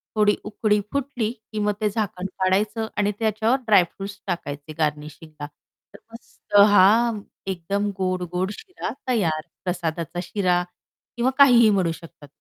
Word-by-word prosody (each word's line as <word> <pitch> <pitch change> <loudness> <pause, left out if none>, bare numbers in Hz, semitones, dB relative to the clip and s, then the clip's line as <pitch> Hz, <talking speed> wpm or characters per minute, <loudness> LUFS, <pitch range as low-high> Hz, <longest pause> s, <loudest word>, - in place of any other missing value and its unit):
थोडी 210 -1 +4
उकळी 210 0 0
फुटली 255 -5 -2
की 220 -2 -9
मग 210 0 +1
ते 210 - +2
झाकण 195 -3 -3
काढायचं 210 +4 +1
आणि 205 0 +2
त्याच्यावर 220 +4 +1
ड्रायफ्रुट्स 195 0 +1
टाकायचे 155 -4 -5
गार्निशिंगला. 150 0 -4 0.5
तर - - -13
मस्त 230 -2 -10
हां, 210 +3 +4 0.3
एकदम 200 +4 -2
गोड-गोड 185 0 -2
शिरा 380 -5 -7 0.2
तयार, 170 -11 +1 0.2
प्रसादाचा 175 -1 -3
शिरा 180 -2 0 0.5
किंवा 250 +2 +2
काहीही 245 -5 +7
म्हणू 185 -5 +2
शकतात. 165 -3 -12
200 Hz, 125 wpm, -23 LUFS, 175-220 Hz, 0.5 s, काहीही